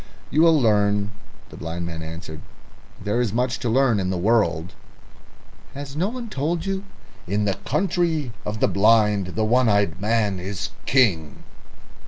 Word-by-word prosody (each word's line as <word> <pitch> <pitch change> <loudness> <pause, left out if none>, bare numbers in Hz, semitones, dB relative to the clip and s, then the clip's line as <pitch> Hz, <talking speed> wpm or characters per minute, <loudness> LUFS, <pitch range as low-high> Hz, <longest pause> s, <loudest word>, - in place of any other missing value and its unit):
"You'll 160 +1 +5
learn," 105 -3 +2 0.4
the - - -11
blind 85 +1 -5
man 80 -1 -6
answered. 80 0 -8 0.6
"There 105 +4 -1
is 115 -5 0
much 120 +1 -1
to 120 -2 -2
learn 125 -2 +3
in 95 -1 -1
the 95 - -1
world." 90 -4 +1 1.0
"Has 140 0 -7
no 180 +6 0
one 245 0 -6
told 165 0 -2
you, 195 0 -3 0.4
'In 105 +3 0
the 100 - +1
Country 160 -4 0
of 105 +1 -5
the - - +4
Blind 105 -3 +3
the 110 - +1
One 120 +2 +3
eyed 100 -4 +1
Man 105 -3 +1
is 95 +1 -4 0.2
King'?" 95 - +2
110 Hz, 155 wpm, -23 LUFS, 95-135 Hz, 1.0 s, You'll